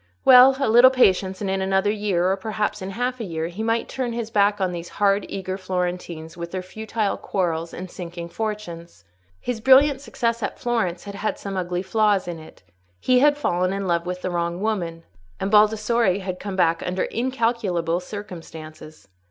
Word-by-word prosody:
Well! 260 +1 +8
a 275 - +1
little 240 +3 +7
patience, 190 -7 +2
and 200 - -2
in 190 0 -1
another 190 +1 +1
year, 195 -4 0
or - - +2
perhaps 210 +1 -3
in 190 - -5
half 245 +5 -2
a - - -3
year, 165 -4 -3
he 185 +5 -7
might 225 +1 0
turn 250 -3 -3
his 230 -1 -4
back 205 0 +3
on 185 -2 0
these 175 -1 -6
hard, 200 0 +2
eager 190 0 -4
Florentines, 180 -3 -4
with 170 0 -6
their 185 +1 -4
futile 215 +2 -3
quarrels 170 -3 -2
and 185 - -7
sinking 170 -1 -7
fortunes. 170 - -6 0.3
His 240 -3 -4
brilliant 270 +3 +5
success 235 -4 -2
at - - -3
Florence 220 -8 -1
had 200 - -8
had 200 +2 -3
some 195 -1 -6
ugly 180 -1 -2
flaws 205 -1 +1
in 170 -2 -5
it: 155 - -15 0.4
he 255 - +3
had 290 +2 +4
fallen 185 -9 0
in 195 0 -3
love 170 -1 0
with 180 0 -4
the 185 - -2
wrong 170 0 -2
woman, 175 -6 -2 0.4
and 195 - -2
Baldassarre 215 -1 +3
had 185 -1 -5
come 200 -1 -5
back 170 -3 +2
under 185 +1 -1
incalculable 225 -9 -1
circumstances. 160 - -10
195 Hz, 185 wpm, -23 LUFS, 175-220 Hz, 0.4 s, Well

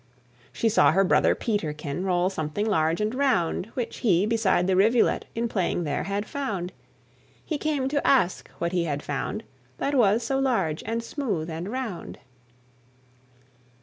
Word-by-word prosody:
She 230 - 0
saw 155 -10 +5
her 195 +3 +4
brother 185 - +3
Peterkin 155 -7 -2
Roll 180 0 +1
something 160 +4 -2
large 165 -6 +1
and 215 +2 0
round, 250 -10 +1
Which 245 -3 -3
he, 190 -4 +3
beside 215 -5 +2
the 190 0 +2
rivulet, 220 +5 +3
In 235 +1 0
playing 185 -5 -1
there, 145 -3 -2
had 200 +1 -2
found. 200 -11 -4 0.7
He 305 -3 -2
came 290 -4 0
to 285 0 0
ask 215 -10 +2
what 170 0 -1
he 175 -2 0
had 145 -2 -3
found, 145 +10 -3 0.3
That 280 - -1
was 230 -3 +3
so 270 +3 0
large, 195 - 0
and 230 +1 -2
smooth, 205 - -3
and 165 +4 -5
round. 235 -7 -5
200 Hz, 155 wpm, -26 LUFS, 170-235 Hz, 0.7 s, saw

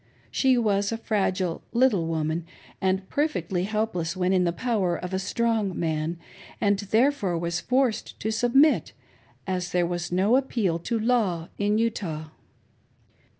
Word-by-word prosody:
She 260 -2 +3
was 205 -3 +1
a 225 - -2
fragile 190 -6 -1
little 230 -9 +3
woman 160 +1 -2 0.3
and 190 0 0
perfectly 185 - -1
helpless 195 -5 -2
when 185 +1 +1
in 180 -1 +3
the 170 - +2
power 190 -2 0
of 180 +1 -6
a 190 - 0
strong 220 -1 0
man, 160 +1 -1 0.4
and 200 -1 +2
therefore 215 -2 +1
was 170 +1 -2
forced 255 -3 0
to 220 - -2
submit, 245 +7 +3 0.5
as 185 -2 -2
there 175 -1 +2
was 175 0 -3
no 195 +7 +3
appeal 220 -11 0
to 230 +7 -2
law 215 -8 +1
in 205 +1 +2
Utah. 180 -9 -2
195 Hz, 145 wpm, -26 LUFS, 175-225 Hz, 0.5 s, She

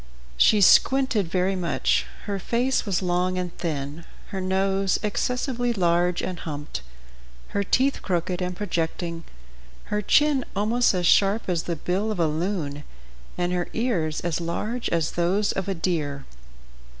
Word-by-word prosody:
She 205 - +5
squinted 255 -1 +4
very 185 +3 0
much; 175 -2 0 0.2
her 200 -2 -2
face 245 +5 0
was 190 -1 0
long 180 +1 0
and 180 -1 -3
thin, 150 -1 -4 0.3
her 195 -2 -4
nose 190 +1 +1
excessively 245 +3 -1
large 175 -2 +1
and 180 -1 -4
humped, 145 -2 -5 0.7
her 200 - -1
teeth 265 +7 +1
crooked 180 0 -1
and 180 0 -2
projecting, 170 -3 -3 0.7
her 210 - +1
chin 295 +4 +3
almost 220 +2 +2
as 180 -1 0
sharp 200 +5 +4
as 175 -3 -1
the 170 - -2
bill 185 +7 -1
of 205 - -4
a 165 - +3
loon, 155 -2 -2 0.5
and 180 0 0
her 175 -1 -1
ears 180 -10 0
as 170 -1 -2
large 215 +8 -2
as 165 -2 0
those 190 +4 +1
of 195 - -3
a 195 - -1
deer. 150 -5 -2
185 Hz, 150 wpm, -25 LUFS, 170-210 Hz, 0.7 s, She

